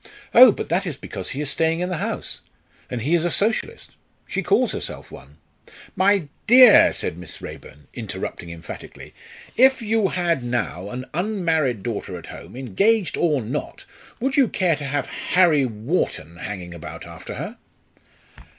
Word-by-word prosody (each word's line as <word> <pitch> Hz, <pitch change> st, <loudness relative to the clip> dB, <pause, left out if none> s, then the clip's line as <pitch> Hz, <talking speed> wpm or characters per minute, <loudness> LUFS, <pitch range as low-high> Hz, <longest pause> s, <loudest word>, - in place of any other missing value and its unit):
"Oh! 250 Hz, 0 st, +10 dB
but -, -, -5 dB
that 180 Hz, +3 st, 0 dB
is 150 Hz, -5 st, -4 dB
because 95 Hz, -7 st, -6 dB
he 140 Hz, -, -3 dB
is 145 Hz, -2 st, 0 dB
staying 165 Hz, +1 st, +1 dB
in 180 Hz, -, -1 dB
the 180 Hz, -, -2 dB
house, -, -, -3 dB, 0.5 s
and 120 Hz, -3 st, -4 dB
he 150 Hz, +6 st, 0 dB
is 170 Hz, -2 st, +3 dB
a 175 Hz, -, +1 dB
Socialist; 220 Hz, +5 st, -1 dB, 0.3 s
she -, -, -2 dB
calls -, -, +2 dB
herself -, -, -6 dB
one 70 Hz, +2 st, -13 dB, 0.3 s
" -, -, -20 dB
"My 195 Hz, -3 st, +3 dB, 0.2 s
dear," 250 Hz, -1 st, +8 dB
said 80 Hz, -, -4 dB
Miss 90 Hz, -, -8 dB
Raeburn, 75 Hz, 0 st, -11 dB
interrupting 85 Hz, -, -6 dB
emphatically; 85 Hz, -1 st, -10 dB, 0.4 s
"if 260 Hz, 0 st, +5 dB
you 220 Hz, -1 st, +2 dB
had 170 Hz, -7 st, 0 dB
now 110 Hz, -6 st, -3 dB
an 125 Hz, +3 st, -6 dB
unmarried 165 Hz, -, 0 dB
daughter 105 Hz, -6 st, -4 dB
at 85 Hz, -, -11 dB
home -, -, -11 dB
engaged 180 Hz, -, +1 dB
or 150 Hz, -7 st, +1 dB
not 130 Hz, +7 st, -5 dB, 0.3 s
would 265 Hz, +2 st, -1 dB
you 270 Hz, -3 st, +5 dB
care 180 Hz, -5 st, +1 dB
to 145 Hz, -1 st, -6 dB
have 140 Hz, -1 st, -1 dB
Harry 165 Hz, -7 st, +2 dB
Wharton 105 Hz, -, -3 dB
hanging 90 Hz, -2 st, -6 dB
about 85 Hz, -, -9 dB
after -, -, -9 dB
her?" -, -, -6 dB
155 Hz, 165 wpm, -22 LUFS, 115-190 Hz, 0.5 s, Oh